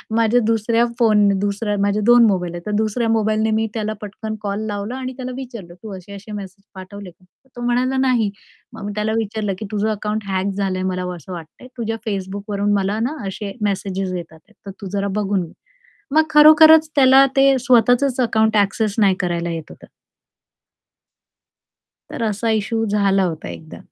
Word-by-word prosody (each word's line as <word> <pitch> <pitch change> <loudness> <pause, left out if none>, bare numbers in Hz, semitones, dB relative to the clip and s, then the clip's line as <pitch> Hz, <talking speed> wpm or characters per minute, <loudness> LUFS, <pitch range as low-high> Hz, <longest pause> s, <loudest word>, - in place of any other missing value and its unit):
माझ्या 230 +1 +3
दुसऱ्या 230 +1 +2
फोन 215 -3 +4
दुसऱ्या 205 +1 -1
माझे 205 +1 +1
2 240 0 +7
मोबाईल 180 -4 -1
आहेत. 175 - -6
तर 210 - -3
दुसऱ्या 220 +2 0
मोबाईलने 220 0 +1
मी 220 +1 +1
त्याला 215 -1 -2
पटकन 215 +1 -6
कॉल 200 -1 -3
लावला 205 +3 -4
आणि 260 0 -5
त्याला 255 -1 -5
विचारलं, 235 -10 -8
"तू 215 -2 -7
असे-असे 200 +3 -11
मेसेज 195 -1 -8
पाठवले 190 +1 -9
का?" 175 +2 -28 0.3
तो 240 - -8
म्हणाला, 250 +2 +1
"नाही." 250 -5 +2 0.4
मग - - -9
मी 205 - -4
त्याला 215 +1 -1
विचारलं, 215 -2 -2
की 215 - -5
"तुझं 210 +1 0
अकाउंट 210 +1 -3
हॅक 190 +1 -1
झालंय 190 -2 -1
मला 180 0 -3
असं 175 +2 -12
वाटतंय. 170 +8 -10
तुझ्या 225 -1 -3
Facebookवरून 200 +1 -2
मला 200 +2 0
ना 305 - -6
असे 200 +1 -5 0.2
मेसेज 195 -1 -3 0.2
येत 170 -2 -7
आहेत. 160 +7 -21
तर 200 - -6
तू 195 - -6
जरा 200 0 -1
बघून 195 -2 0
घे." 165 - -10 0.6
मग 315 - +6
खरोखरच 315 +1 +7
त्याला 270 -1 +7
ते 270 0 +5
स्वतःचंच 245 +1 +3
अकाउंट 220 -2 +2
एक्सेस 205 +1 -2
नाही 195 -3 +4
करायला 170 -1 -2
येत 165 -1 -6
होतं. - - -14 2.2
तर 230 - -4
असा 220 +1 -1
इश्यू 220 +1 -1
झाला 200 -2 +2
होता 160 - -4
एकदा. 80 -2 -10
210 Hz, 175 wpm, -20 LUFS, 195-230 Hz, 2.2 s, 2